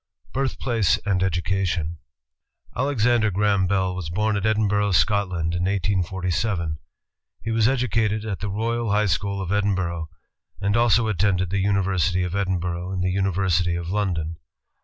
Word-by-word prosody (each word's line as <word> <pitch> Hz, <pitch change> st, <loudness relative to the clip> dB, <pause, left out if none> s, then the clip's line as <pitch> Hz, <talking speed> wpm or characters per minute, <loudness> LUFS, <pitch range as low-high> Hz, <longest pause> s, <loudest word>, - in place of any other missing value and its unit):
Birthplace 120 Hz, -6 st, +1 dB
and 95 Hz, -3 st, +1 dB
Education 85 Hz, -3 st, -1 dB, 0.8 s
Alexander 120 Hz, -4 st, +2 dB
Graham 100 Hz, -1 st, +2 dB
Bell 95 Hz, -1 st, +1 dB
was 90 Hz, -4 st, -5 dB
born 105 Hz, +5 st, 0 dB
at 100 Hz, +1 st, 0 dB
Edinburgh, 105 Hz, -2 st, +1 dB
Scot 100 Hz, +2 st, +2 dB
land, 85 Hz, -2 st, -2 dB
in 85 Hz, +1 st, -1 dB
1847. 95 Hz, -3 st, -1 dB, 0.7 s
H^ 115 Hz, -, -1 dB
was 110 Hz, -1 st, +3 dB
educated 115 Hz, -4 st, 0 dB
at 105 Hz, -3 st, -3 dB
the 105 Hz, -, -3 dB
Royal 115 Hz, +3 st, -1 dB
High 105 Hz, +1 st, +2 dB
School 100 Hz, 0 st, -1 dB
of 95 Hz, -1 st, -4 dB
Edinburgh, 95 Hz, -5 st, 0 dB, 0.5 s
and 100 Hz, +1 st, 0 dB
also 115 Hz, -1 st, +3 dB
attended 95 Hz, -2 st, +1 dB
the 100 Hz, -, 0 dB
University 95 Hz, -2 st, +1 dB
of 90 Hz, -1 st, -3 dB
Edin 95 Hz, -2 st, 0 dB
burgh 90 Hz, +1 st, -3 dB
and 90 Hz, -1 st, -2 dB
the 90 Hz, -, +1 dB
University 90 Hz, -2 st, +1 dB
of 85 Hz, -1 st, -4 dB
London. 85 Hz, -5 st, -1 dB
95 Hz, 150 wpm, -23 LUFS, 90-105 Hz, 0.8 s, was